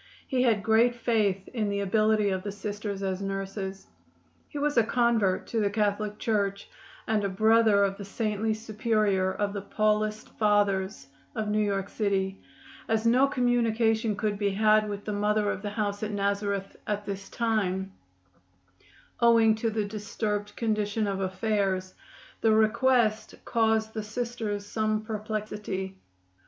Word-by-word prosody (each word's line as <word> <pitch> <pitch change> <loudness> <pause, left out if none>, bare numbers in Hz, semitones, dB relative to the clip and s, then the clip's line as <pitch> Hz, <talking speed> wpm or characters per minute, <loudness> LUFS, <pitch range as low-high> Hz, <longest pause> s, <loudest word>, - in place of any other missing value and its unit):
He 260 -2 +1
had 225 -5 +2
great 225 +2 +4
faith 215 -5 0
in 220 -5 -2
the 200 0 -1
ability 215 +1 +2
of 190 -1 -1
the 205 - -4
Sisters 205 0 -5
as 190 0 -2
nurses. 195 0 -4 0.6
He - - -7
was 290 +1 0
a 230 - +5
convert 225 -5 +1
to 230 - 0
the 205 -2 +2
Catholic 210 0 -1
Church, 200 -3 -1 0.4
and 215 -2 +1
a 200 - 0
brother 220 +1 +4
of 195 0 0
the 200 - -7
saintly 215 +1 -1
superior 215 -3 0
of 200 +1 -2
the 200 - -4
Paulist 215 +1 0
Fathers 205 -3 +1 0.3
of 215 -2 -2
New 210 +1 +2
York 200 -2 -1
city. 195 -2 -1 0.5
As 220 0 0
no 250 +4 +5
communication 230 -4 +1
could 205 0 -2
be 205 -1 +2
had 215 +1 +3
with 205 0 -5
the 210 - -2
Mother 210 0 +1
of - - -5
the 205 - -3
house 205 -1 -2
at 215 - -2
Nazareth 200 -1 -1
at 210 0 -2
this 195 0 -6
time, 195 -5 -1 1.3
owing 230 -2 +5
to 225 +1 -1
the 215 -1 -1
disturbed 205 0 -3
condition 215 -1 0
of 195 -1 -2
affairs, 190 -1 -1 0.5
the 225 - +4
request 220 0 +2
caused 220 -1 +1
the 220 - -3
Sisters 215 -2 -4
some 215 0 -1
perplexity. 210 -3 -4
210 Hz, 150 wpm, -28 LUFS, 200-220 Hz, 1.3 s, a